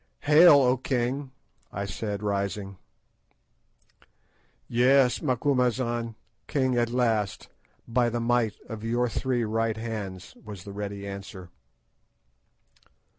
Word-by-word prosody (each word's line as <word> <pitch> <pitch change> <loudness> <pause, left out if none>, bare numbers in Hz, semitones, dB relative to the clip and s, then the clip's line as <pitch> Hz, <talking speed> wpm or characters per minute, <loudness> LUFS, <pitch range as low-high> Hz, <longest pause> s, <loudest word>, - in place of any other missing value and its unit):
"Hail, 155 +3 +7
O 130 -2 +4
king!" 130 +2 -2 0.4
I 100 +1 -4
said, 100 +1 -4
rising. 100 -1 -2 1.9
"Yes, 125 +1 +3
Macumazahn. 125 -4 0 0.3
King 130 -3 +1
at 120 -1 +1
last, 115 -5 0 0.4
by 120 0 +2
the 120 +1 -2
might 115 -2 +1
of 110 -1 -7
your 120 +2 +1
three 125 +1 -1
right 110 0 -1
hands," 105 -5 -6
was 105 -4 -9
the 100 - -9
ready 100 0 -5
answer. 95 -2 -8
115 Hz, 105 wpm, -27 LUFS, 105-125 Hz, 1.9 s, Hail